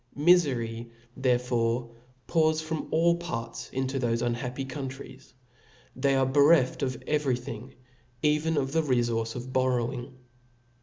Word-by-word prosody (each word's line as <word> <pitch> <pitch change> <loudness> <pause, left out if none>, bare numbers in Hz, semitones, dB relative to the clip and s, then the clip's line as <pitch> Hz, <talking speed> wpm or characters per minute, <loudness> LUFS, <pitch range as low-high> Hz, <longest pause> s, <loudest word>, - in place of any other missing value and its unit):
Miiery 130 -9 +2 0.3
therefore 120 -2 0 0.3
pours 155 -1 +2
in 160 - -6
from 160 -1 -3
ail 170 +1 +3
parts 115 -9 -5
into 130 +1 -2
thofe 115 -1 0
unhappy 125 +2 -3
countries 135 -1 -8
i 125 -2 -31
they 135 +1 +2
are 135 0 +3
bereft 140 0 +4
of 130 -2 -1
every 145 -5 +1
thing, 125 +2 -8 0.5
even 150 +1 +2
of 135 -1 0
the 160 +2 +2
refource 120 -5 0
of 125 +1 -6
borrowing. 130 0 -1
130 Hz, 135 wpm, -28 LUFS, 120-145 Hz, 0.5 s, bereft